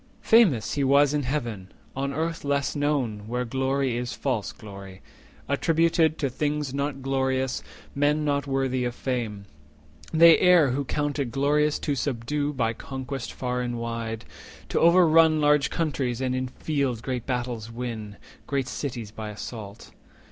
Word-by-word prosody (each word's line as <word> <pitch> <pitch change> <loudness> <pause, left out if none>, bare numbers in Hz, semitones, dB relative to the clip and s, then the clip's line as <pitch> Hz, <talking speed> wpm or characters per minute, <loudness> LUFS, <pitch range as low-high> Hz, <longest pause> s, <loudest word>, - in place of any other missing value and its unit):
Famous 195 - +4
he 145 - 0
was 140 +1 +4
in 150 - +1
Heaven; 120 -8 -3 0.2
on 140 +1 -2
Earth 165 +3 -2
less 140 0 0
known, 130 -8 -1
Where 125 +2 -2
glory 135 0 0
is 120 0 -3
false 115 -5 -2
glory, 100 -3 -11 0.4
attributed 160 +2 +2
To 140 - 0
things 145 +1 -2
not 140 -1 -3
glorious, 130 -1 0 0.3
men 150 +2 +1
not 140 -1 0
worthy 135 -2 0
of 120 0 -2
fame. 115 -6 -3 0.6
70 160 - -4
They 165 0 +8
err 175 -7 +5
who 140 +2 -1
count 145 +1 -2
it 135 -4 -1
glorious 150 +3 +2
to 145 - -2
subdue 145 +2 -1
By 115 -5 0
conquest 130 0 -6
far 125 -1 -2
and 120 -1 -3
wide, 115 -2 -4 0.4
to - - +1
overrun 165 -2 +5
Large 150 -1 +3
countries, 135 -7 -1
and 130 -1 -1
in 130 0 -1
field 135 -4 -2
great 125 -3 -3
battles 120 -3 -3
win, 115 -4 -5 0.3
Great 135 -2 -1
cities 120 -6 -5
by 110 0 -6
assault. 105 0 -8
135 Hz, 155 wpm, -26 LUFS, 120-145 Hz, 0.6 s, They